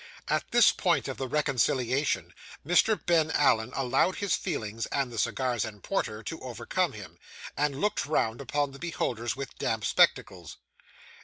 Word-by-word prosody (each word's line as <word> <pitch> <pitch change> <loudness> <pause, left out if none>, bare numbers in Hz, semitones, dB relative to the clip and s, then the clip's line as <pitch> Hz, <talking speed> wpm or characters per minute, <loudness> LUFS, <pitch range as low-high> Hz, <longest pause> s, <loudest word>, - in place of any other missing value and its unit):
At - - 0
this - - +6
point - - +1
of - - -5
the 135 - -3
reconciliation, 130 0 0 0.3
Mr. 180 +6 +3
Ben 165 -3 +3
Allen 120 -7 +2
allowed 135 +7 +1
his 200 -4 -1
feelings 110 +1 -4
and 135 -3 -1
the 115 - -4
cigars 125 -3 0
and 105 -2 -8
porter 110 - -2
to 165 - -6
overcome 125 -5 -2
him, - - -11 0.4
and 140 -1 -1
looked 210 -5 0
round 120 -5 0
upon 145 +1 -1
the 135 - -12
beholders 120 -9 -2
with 135 0 -7
damp 110 -1 -1
spectacles. - - +1
135 Hz, 155 wpm, -28 LUFS, 115-150 Hz, 0.4 s, this